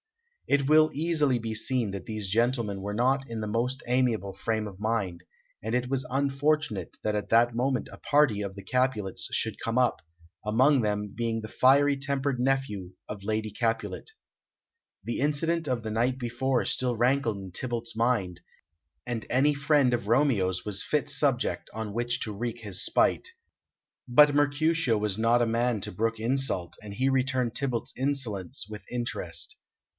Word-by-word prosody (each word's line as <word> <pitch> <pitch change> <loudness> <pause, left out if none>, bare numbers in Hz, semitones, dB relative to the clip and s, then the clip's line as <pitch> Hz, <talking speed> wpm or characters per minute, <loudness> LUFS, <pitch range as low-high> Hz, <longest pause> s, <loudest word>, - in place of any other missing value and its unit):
It 140 -1 +2
will 155 +1 +6
easily 150 -4 +1
be 115 -1 -4
seen 115 -1 0
that 100 - -7
these 110 -3 -4
gentlemen 115 -2 0
were 100 +1 -4
not 135 +3 +1
in 115 -1 -4
the 105 - -3
most 120 +5 -1
amiable 120 -6 +1
frame 110 +2 -2
of 100 -1 -11
mind, 105 -6 -1 0.4
and 110 +2 -3
it 125 0 -1
was 130 -1 -1
unfortunate 140 - 0
that 105 0 0
at 105 - -3
that 115 +1 +4
moment 130 +1 0
a - - -11
party 140 -8 +3
of 100 -1 -5
the 100 - -9
Capulets 125 -7 -1
should - - -1
come 115 +1 -1
up, 125 -1 +2 0.4
among 130 +6 +4
them 105 -1 -2
being 115 -1 -1
the 110 - -6
fiery 140 +5 +4
tempered 135 -1 -1
nephew 125 -8 -1
of 100 -2 -7
Lady 110 +1 -2
Capulet. 115 - -2 1.0
The 120 - -2
incident 160 +3 0
of 120 -3 -1
the 110 - -4
night 120 +4 +1
before 125 +1 -1
still 125 -2 0
rankled 120 -2 +2
in 95 -2 -8
Tybalt's 120 +3 -3
mind, 110 -7 0 0.6
and 120 -3 -4
any 135 +4 +3
friend 140 -2 +3
of 120 -3 -1
Romeo's 110 -8 +2
was 100 -2 0
fit 150 -4 0
subject 135 -4 0
on 110 -2 -5
which 120 +2 -1
to 105 -2 -4
wreak 120 +2 -4
his 100 -5 -1
spite. - - +2 0.8
But 145 +4 +6
Mercutio 145 -3 +2
was 105 -2 0
not 120 +2 +4
a - - +1
man 115 0 +1
to - - -3
brook 115 +4 -1
insult, 120 -7 0
and 100 -1 -8
he 130 +4 +1
returned 130 -3 +1
Tybalt's 130 -4 -2
insolence 130 -5 -1
with 105 -1 -8
interest. 115 -9 -4
120 Hz, 170 wpm, -28 LUFS, 105-135 Hz, 1.0 s, will